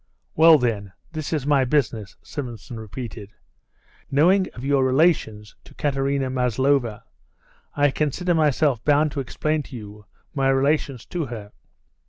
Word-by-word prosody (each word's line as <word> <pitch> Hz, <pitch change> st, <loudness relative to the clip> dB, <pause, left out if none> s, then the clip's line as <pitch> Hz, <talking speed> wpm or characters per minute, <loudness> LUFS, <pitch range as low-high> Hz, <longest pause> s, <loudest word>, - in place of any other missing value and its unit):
"Well, 160 Hz, 0 st, +7 dB
then, 105 Hz, -7 st, -2 dB, 0.2 s
this 155 Hz, -2 st, -5 dB
is 150 Hz, -5 st, -1 dB
my 145 Hz, -2 st, +3 dB
business," 120 Hz, -7 st, -1 dB
Simonson 120 Hz, -3 st, -7 dB
repeated. 110 Hz, -2 st, -8 dB, 0.8 s
"Knowing 180 Hz, +7 st, +3 dB
of 125 Hz, -, -7 dB
your 140 Hz, -1 st, +2 dB
relations 130 Hz, -7 st, +1 dB
to -, -, -16 dB
Katerina 135 Hz, -2 st, -1 dB
Maslova, 125 Hz, -2 st, 0 dB, 0.7 s
I 145 Hz, -1 st, +3 dB
consider 155 Hz, +6 st, 0 dB
myself 150 Hz, -5 st, +2 dB
bound 150 Hz, +1 st, +3 dB
to 140 Hz, -, -4 dB
explain 150 Hz, +6 st, -1 dB
to 140 Hz, -2 st, -11 dB
you 105 Hz, -2 st, -10 dB, 0.3 s
my 135 Hz, -3 st, +1 dB
relations 135 Hz, -2 st, +1 dB
to 170 Hz, -5 st, -4 dB
her." 110 Hz, -4 st, -8 dB
135 Hz, 135 wpm, -23 LUFS, 120-150 Hz, 0.8 s, Well